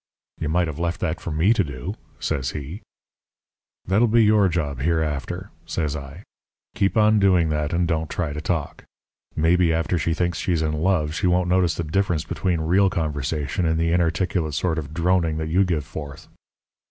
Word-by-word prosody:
"'You 75 - -2
might 85 +2 +2
have 80 -1 -6
left 85 0 -1
that 80 +2 -2
for - - -5
me 80 +8 +3
to 105 - +2
do,' 70 +5 -5 0.3
says 65 -2 -2
he. 75 +7 -6 1.0
"'That'll 105 +6 +3
be 115 +1 +4
your 105 -2 +4
job 75 -6 -2
hereafter,' 80 +4 -2 0.2
says 75 -3 -2
I. 70 +5 -8 0.5
'Keep 95 +3 0
on 105 0 +5
doing 90 -5 +3
that 75 -1 -1
and 85 0 +1
don't 80 -1 -1
try 80 -4 -2
to 75 - -5
talk. 80 -2 -3 0.5
Maybe 85 +2 +3
after 80 +2 0
she 80 +2 0
thinks 85 -2 -1
she's 85 -3 0
in 75 0 0
love 80 -1 +1
she 95 +2 0
won't 90 0 +2
notice 90 -2 +2
the 85 - -2
difference 85 0 0
between 90 -4 -1
real 95 +5 +3
conversation 75 +1 -2
and 80 0 +1
the 85 0 +1
inarticulate 85 -1 0
sort 80 +1 0
of 70 -2 -7
droning 85 -1 +1
that 80 0 -3
you 90 +5 +3
give 80 -6 -1
forth.' 75 -2 -8
80 Hz, 185 wpm, -23 LUFS, 75-90 Hz, 1.0 s, on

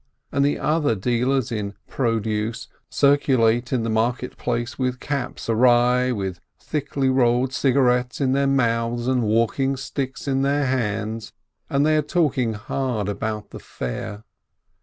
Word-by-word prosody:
And 140 - +2
the 145 - +2
other 150 -6 +1
dealers 125 +4 0
in 105 -3 -3
produce 115 -2 -1 0.2
circulate 125 -4 +3
in 125 -4 +1
the 115 - -1
market 120 +3 -1
place 120 +1 -3
with 125 -1 -1
caps 140 -3 -4
awry, 125 +2 +4
with 95 -6 -3 0.2
thickly 145 -2 -2
rolled 130 0 +2
cigarettes 125 -2 +2
in 135 -2 +1
their 140 +1 +2
mouths 120 -3 +1
and 130 -1 +2
walking 115 +5 +1
sticks 130 +2 -5
in 135 -1 +1
their 140 +1 +1
hands, 110 -3 -2 0.4
and 140 +1 +2
they 155 0 +3
are - - +3
talking 145 -7 +1
hard 110 0 -2
about 105 +1 -4
the - - -8
fair. 100 - -6
125 Hz, 140 wpm, -23 LUFS, 115-135 Hz, 0.4 s, awry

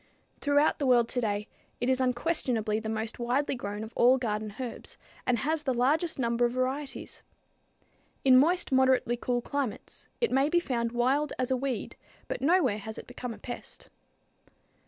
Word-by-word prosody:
Throughout 290 +2 +2
the 280 - 0
world 240 -2 +5
today 215 -4 -1 0.3
it 245 - -1
is 260 0 +2
unquestionably 245 -5 +1
the 220 0 -5
most 220 +1 -3
widely 250 +4 0
grown 210 -4 -5
of 220 +2 -9
all 250 +2 +5
garden 215 -4 -3
herbs, 250 -3 -7 0.3
and 250 - +3
has 310 +7 -1
the 265 -4 -1
largest 300 +8 +1
number 235 -2 0
of 240 0 +2
varieties. 265 +3 -3 1.0
In 260 -1 +7
moist, 340 +7 +4
moderately 260 -2 +3
cool 245 0 -2
climates, 280 -5 -4
it 470 - +1
may 270 +2 +3
be 345 - +3
found 235 -8 -2
wild 265 +5 +1
as 255 0 -1
a - - +4
weed, 260 -2 -3 0.3
but - - -4
nowhere 275 - +3
has 220 +1 -7
it - - -8
become 245 0 -6
a 225 - -8
pest. 240 +3 -9
250 Hz, 170 wpm, -29 LUFS, 235-275 Hz, 1.0 s, In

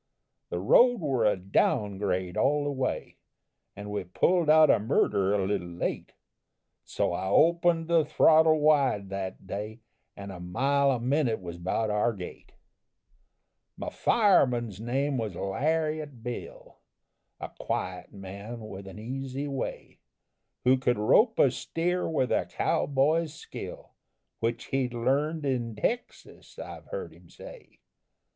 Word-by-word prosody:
The - - -3
road 240 - +5
were 135 -8 0
a 105 - +3
down 100 - 0
grade 95 -3 -2
all 145 +1 +2
the 145 - -1
way, 130 -2 -3 0.6
An' 105 +1 -7
we 105 - -2
pulled 165 - +1
out 155 0 +7
of 110 - +2
Murder 100 -2 +1
a 100 -2 0
little 95 -3 -2
late, 85 0 -4 0.7
So - - -1
I 95 - -3
opened 165 - +3
the 165 -1 +4
throttle 155 +1 +5
wide 140 -10 +2
that 95 -1 -5
day, 105 +4 -6 0.4
And 100 0 -7
a 90 - -9
mile 135 +11 +1
a 130 -3 +1
minute 130 -1 +1
was 85 -2 -8
'bout 105 +5 -1
our 105 +3 +1
gait. 95 -4 -10 1.2
"My - - -5
fireman's 125 - +2
name 135 +3 -1
was 105 -5 -3
Lariat 150 - -2
Bill, 120 0 -8 0.6
A - - -6
quiet 90 0 -4
man 100 +4 -8
with 95 -1 -9
an 95 - -10
easy 135 +5 -5
way, 135 -2 -5 0.6
Who 130 +1 +5
could 125 -1 +1
rope 220 - +4
a 135 - +5
steer 175 +7 -2
with 140 -6 0
a - - +1
cow - - 0
boy's 150 +3 +1
skill, - - -9 0.5
Which 115 +1 -2
he'd 125 -2 0
learned 145 +6 0
in 120 -4 -1
Texas, 240 - -4
I've - - -9
heard - - -6
him - - -19
say. - - -13
125 Hz, 140 wpm, -28 LUFS, 100-150 Hz, 1.2 s, out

